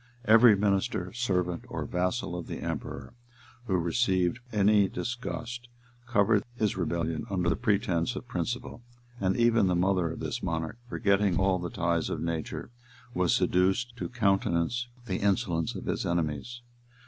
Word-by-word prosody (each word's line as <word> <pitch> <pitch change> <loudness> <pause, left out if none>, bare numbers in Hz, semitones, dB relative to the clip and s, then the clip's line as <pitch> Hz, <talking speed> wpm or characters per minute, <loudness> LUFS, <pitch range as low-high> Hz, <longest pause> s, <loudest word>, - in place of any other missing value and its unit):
Every 110 0 +7
minister, 95 -2 0
servant, 90 -8 -1
or - - -4
vassal 90 +2 -1
of 90 - -5
the - - -5
emperor, 70 -1 -5 0.5
who 95 - +1
received 90 +2 +1
any 105 -1 +4
disgust, 120 +1 -5 0.4
covered 100 0 +3
his 110 -3 0
rebellion 85 0 -2
under 90 -3 0
the - - +2
pretence 95 -1 0
of - - -7
principle; 120 -1 -4 0.4
and 95 -1 +1
even 115 -4 +4
the 90 - +2
mother 90 -1 +2
of - - -7
this - - -3
monarch, 80 +6 -3
forgetting 100 -5 +2
all 95 -1 +2
the 90 - -4
ties 85 -6 0
of - - -3
nature, 85 +6 -4 0.4
was 90 -3 +2
seduced 95 +7 +1
to - - -4
countenance 100 0 +1 0.2
the 95 -5 -2
insolence 95 -5 0
of - - -6
his - - -1
enemies. 85 - -2
95 Hz, 150 wpm, -29 LUFS, 85-115 Hz, 0.5 s, Every